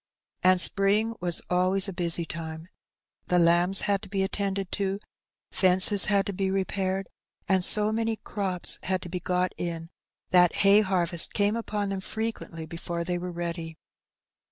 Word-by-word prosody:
And 185 Hz, 0 st, +4 dB
spring 205 Hz, +4 st, +2 dB
was 175 Hz, -1 st, 0 dB
always 185 Hz, +2 st, +2 dB
a 195 Hz, -, -5 dB
busy 170 Hz, -1 st, +2 dB
time: 160 Hz, +1 st, -7 dB, 0.6 s
the 180 Hz, -, +2 dB
lambs 175 Hz, +3 st, +3 dB
had 200 Hz, -1 st, 0 dB
to 205 Hz, -, -11 dB
be 195 Hz, -1 st, -1 dB
at 190 Hz, -, -3 dB
tended 195 Hz, -2 st, -3 dB
to; 195 Hz, -1 st, -2 dB, 0.5 s
fences 190 Hz, +2 st, +4 dB
had 200 Hz, -2 st, +1 dB
to 200 Hz, -, -4 dB
be 190 Hz, +1 st, -1 dB
repaired; 190 Hz, 0 st, -2 dB, 0.4 s
and 190 Hz, -2 st, +2 dB
so 210 Hz, +3 st, +5 dB
many 225 Hz, 0 st, -1 dB
^^ -, -, -46 dB
crops" 190 Hz, -4 st, -3 dB
had 185 Hz, -1 st, -2 dB
to 175 Hz, -, -8 dB
be 180 Hz, +1 st, -4 dB
got 180 Hz, 0 st, -1 dB
in, 165 Hz, -1 st, -5 dB, 0.4 s
that 180 Hz, -1 st, +5 dB
hay 200 Hz, +2 st, +6 dB
harvest 175 Hz, -4 st, 0 dB
came 205 Hz, +1 st, +1 dB
upon 210 Hz, -3 st, -3 dB
them 195 Hz, -1 st, -3 dB
frequently 220 Hz, -7 st, -5 dB
before 170 Hz, +1 st, -5 dB
they 175 Hz, +1 st, -2 dB
were 180 Hz, 0 st, -5 dB
ready. 170 Hz, -2 st, -5 dB
185 Hz, 170 wpm, -26 LUFS, 175-200 Hz, 0.6 s, hay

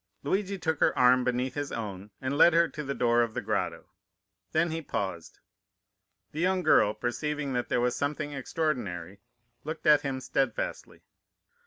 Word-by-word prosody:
"Luigi 195 Hz, 0 st, -1 dB
took 160 Hz, -4 st, -1 dB
her -, -, +2 dB
arm 125 Hz, 0 st, +5 dB
beneath 125 Hz, +1 st, -1 dB
his 145 Hz, -1 st, -4 dB
own, 100 Hz, -3 st, -5 dB
and 130 Hz, +2 st, -2 dB
led 170 Hz, +3 st, +6 dB
her 170 Hz, 0 st, +4 dB
to 150 Hz, -, -7 dB
the 140 Hz, 0 st, -3 dB
door 120 Hz, -1 st, +3 dB
of 115 Hz, -2 st, -1 dB
the -, -, 0 dB
grotto. -, -, -2 dB, 0.7 s
Then 160 Hz, +1 st, +1 dB
he 165 Hz, +1 st, -3 dB
paused. 95 Hz, -, -4 dB, 0.9 s
The 155 Hz, -, -6 dB
young 185 Hz, +1 st, +1 dB
girl, 105 Hz, -9 st, +4 dB
perceiving 145 Hz, +3 st, -2 dB
that 125 Hz, -1 st, -2 dB
there -, -, +1 dB
was 125 Hz, 0 st, +1 dB
something 145 Hz, +1 st, -2 dB
extraordinary, 120 Hz, -, -3 dB, 0.4 s
looked 155 Hz, +2 st, -6 dB
at 150 Hz, -1 st, +6 dB
him 135 Hz, -3 st, -3 dB
steadfastly. 130 Hz, -2 st, -2 dB
135 Hz, 165 wpm, -28 LUFS, 120-155 Hz, 0.9 s, led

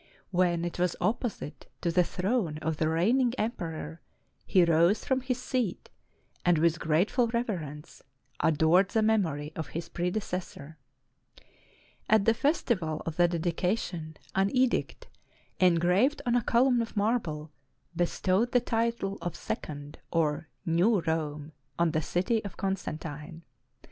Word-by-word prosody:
When 175 Hz, -2 st, +2 dB
it 175 Hz, -, -5 dB
was 180 Hz, -1 st, +1 dB
opposite 220 Hz, -, -2 dB
to 170 Hz, -, 0 dB
the 180 Hz, +1 st, +4 dB
throne 180 Hz, -3 st, -1 dB
of 160 Hz, -1 st, -1 dB
the 155 Hz, 0 st, +1 dB
reigning 235 Hz, +10 st, +2 dB
emperor, 165 Hz, -7 st, -4 dB, 0.5 s
he 185 Hz, -3 st, +5 dB
rose 170 Hz, +5 st, +3 dB
from 260 Hz, -1 st, +1 dB
his 255 Hz, -1 st, -2 dB
seat, 250 Hz, -6 st, -2 dB, 0.5 s
and 175 Hz, -2 st, +4 dB
with 165 Hz, +1 st, +2 dB
grateful 185 Hz, -, +2 dB
reverence, 180 Hz, -, -4 dB, 0.4 s
adored 160 Hz, +5 st, +4 dB
the 220 Hz, +1 st, +1 dB
memory 160 Hz, -9 st, +1 dB
of 160 Hz, -3 st, -4 dB
his 170 Hz, 0 st, -5 dB
predecessor. 175 Hz, -4 st, -4 dB, 1.3 s
At 215 Hz, -2 st, +4 dB
the 225 Hz, -, +5 dB
festival 225 Hz, -, 0 dB
of 165 Hz, -1 st, -4 dB
the 175 Hz, 0 st, +5 dB
dedi 170 Hz, 0 st, -1 dB
cation, 175 Hz, -5 st, -2 dB, 0.2 s
an 195 Hz, +1 st, +2 dB
edict, 255 Hz, -1 st, +1 dB, 0.5 s
engraved 180 Hz, -, +3 dB
on 240 Hz, -, +1 dB
a 245 Hz, -, +3 dB
column 240 Hz, +2 st, +3 dB
of 225 Hz, -1 st, -6 dB
marble, 175 Hz, -9 st, -1 dB, 0.4 s
be 175 Hz, +1 st, +2 dB
stowed 200 Hz, +9 st, 0 dB
the 250 Hz, -, +6 dB
title 230 Hz, -4 st, -1 dB
of 175 Hz, -, -4 dB
Second 145 Hz, -1 st, -6 dB
or 160 Hz, -1 st, 0 dB, 0.2 s
New 180 Hz, +5 st, +3 dB
Rome 155 Hz, -2 st, -2 dB, 0.3 s
on 170 Hz, -1 st, +2 dB
the 155 Hz, 0 st, 0 dB
city 185 Hz, +8 st, 0 dB
of 200 Hz, -4 st, -8 dB
Constantine. 165 Hz, -4 st, -4 dB
175 Hz, 140 wpm, -29 LUFS, 160-220 Hz, 1.3 s, the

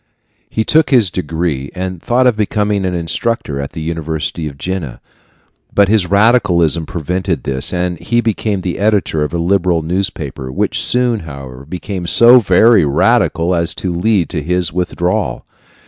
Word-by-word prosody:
He 110 Hz, -, -1 dB
took 160 Hz, 0 st, +3 dB
his 115 Hz, -9 st, +3 dB
degree, 80 Hz, -5 st, -3 dB
and 90 Hz, -2 st, -5 dB
thought 125 Hz, +2 st, +1 dB
of 125 Hz, -3 st, +3 dB
becoming 105 Hz, -2 st, -1 dB
an 90 Hz, -1 st, -1 dB
instructor 85 Hz, -, -2 dB
at 70 Hz, -, -7 dB
the 80 Hz, -, -6 dB
university 80 Hz, 0 st, -3 dB
of 70 Hz, -2 st, -9 dB
Jena; 85 Hz, -6 st, -5 dB, 0.7 s
but 100 Hz, -1 st, +3 dB
his 105 Hz, -5 st, +2 dB
radicalism 90 Hz, -7 st, +2 dB
prevented 90 Hz, +2 st, -3 dB
this, 65 Hz, -1 st, -1 dB
and 90 Hz, -1 st, -2 dB
he 120 Hz, +6 st, 0 dB
became 110 Hz, -3 st, -1 dB
the 90 Hz, 0 st, -4 dB
editor 100 Hz, -6 st, +1 dB
of 75 Hz, -, -3 dB
a 85 Hz, -, -2 dB
liberal 85 Hz, -1 st, +1 dB
newspaper, 80 Hz, -7 st, -3 dB
which -, -, 0 dB
soon, 125 Hz, -2 st, +2 dB
however, 70 Hz, -4 st, -10 dB
became 90 Hz, 0 st, -5 dB
so 120 Hz, +6 st, +7 dB
very 105 Hz, 0 st, +4 dB
radical 80 Hz, +4 st, +2 dB
as 85 Hz, 0 st, 0 dB
to 90 Hz, -2 st, -3 dB
lead 90 Hz, 0 st, +1 dB
to 80 Hz, -, -3 dB
his 90 Hz, +2 st, -1 dB
withdrawal. 90 Hz, 0 st, -2 dB
90 Hz, 160 wpm, -15 LUFS, 80-105 Hz, 0.7 s, so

